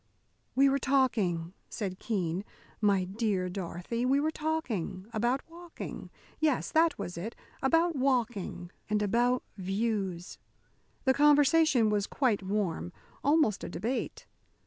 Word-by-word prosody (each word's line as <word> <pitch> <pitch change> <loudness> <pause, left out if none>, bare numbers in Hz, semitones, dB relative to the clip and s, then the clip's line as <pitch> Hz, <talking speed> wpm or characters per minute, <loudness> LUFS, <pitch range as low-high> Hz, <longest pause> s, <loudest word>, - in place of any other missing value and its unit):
"We 275 +2 +6
were 275 0 +2
talking," 215 -12 +1 0.2
said 190 -4 -4
Keene, 185 -4 -1 0.4
"my 200 -3 +3
dear 195 -1 -1
Dorothy, 180 +5 -4
we 265 +2 +3
were 310 +2 +1
talking 300 - -2
about 240 +5 0
walking 340 0 -8 0.3
yes, 305 -4 +1
that 325 +1 +3
was 180 -4 -5
it 220 +7 -5 0.3
about 330 +5 +3
walking, 240 -9 -1 0.2
and 210 0 +1
about 240 +4 +2
views. 195 -2 -2 0.7
The 265 - +5
conversation 290 -4 +5
was 205 -1 +1
quite 245 -8 +1
warm, 190 -3 -2 0.3
almost 285 -8 +3
a - - -4
debate. 220 +10 -3
225 Hz, 125 wpm, -30 LUFS, 190-275 Hz, 0.7 s, We